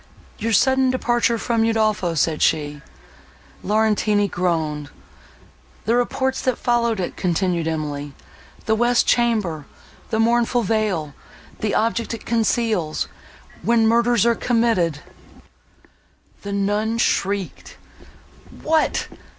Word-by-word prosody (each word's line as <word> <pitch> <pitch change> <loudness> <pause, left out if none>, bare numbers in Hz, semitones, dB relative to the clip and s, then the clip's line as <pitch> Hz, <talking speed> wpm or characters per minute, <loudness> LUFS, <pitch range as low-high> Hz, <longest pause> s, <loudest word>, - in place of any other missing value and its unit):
"Your 230 - -1
sudden 265 +3 +3
departure 240 -2 +1
from 230 0 0
Udolpho"—said 205 -9 +1
she. 150 -2 0 0.8
Laurentini 210 0 +2
groaned. 160 -6 -2 1.0
"The 225 - +2
reports 260 +2 0
that 255 -2 0
followed 235 -3 +1
it," 180 - -3
continued 175 -2 0
Emily—"The 150 +6 -5
west 240 +2 +2
chamber—the 220 - -2
mournful 235 +1 +2
veil—the 205 -1 -3
object 230 +1 0
it 225 - -12
conceals!—when 225 0 -1
murders 235 -1 +3
are 235 - +4
committed—" 225 - +1 1.4
The 200 - -6
nun 205 +3 0
shrieked. 200 -4 -1 0.9
"What! 315 0 +1
220 Hz, 90 wpm, -21 LUFS, 175-235 Hz, 1.4 s, are